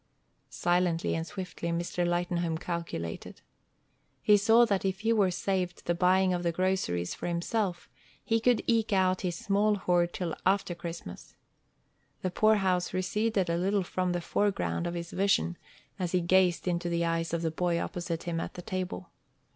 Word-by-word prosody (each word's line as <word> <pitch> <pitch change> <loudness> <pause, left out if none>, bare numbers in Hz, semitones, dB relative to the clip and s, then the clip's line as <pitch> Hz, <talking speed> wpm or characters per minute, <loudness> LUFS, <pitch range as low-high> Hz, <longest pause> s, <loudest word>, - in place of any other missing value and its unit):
Silently 175 -1 +1
and 165 +1 -2
swiftly 180 -3 -5
Mr. 175 +1 -1
Lightenhome 175 -1 0
calculated. 170 - -5 0.8
He 210 - +6
saw 225 +4 +5
that 200 -4 0
if 190 0 -1
he 225 +1 +2
were 205 -4 +3
saved 180 0 -2
the 175 - +1
buying 185 +1 +3
of 175 - -1
the 170 -1 0
groceries 170 - 0
for - - -5
himself, 175 +2 -1 0.4
he 225 0 +2
could 240 0 +2
eke 225 -2 +1
out 185 -1 +2
his 180 -2 -2
small 205 +3 +2
hoard 175 -3 +1
till 175 -3 -3
after 190 -1 +2
Christmas. 170 - -8 0.9
The 185 - 0
poorhouse 190 -3 +2
receded 195 +1 0
a 170 0 0
little 195 +2 +1
from 180 +1 -1
the 175 0 -1
foreground 195 -1 0
of 170 - -4
his 170 -1 -5
vision 85 - +1 0.4
as 180 -1 -2
he 180 - +3
gazed 180 0 +3
into 175 0 0
the 170 0 0
eyes 165 0 -1
of 170 0 -1
the 160 - 0
boy 170 +1 0
opposite 170 -2 -4
him 170 -1 -2
at - - -5
the 180 - -7
table. 185 - -4
180 Hz, 170 wpm, -29 LUFS, 170-195 Hz, 0.9 s, He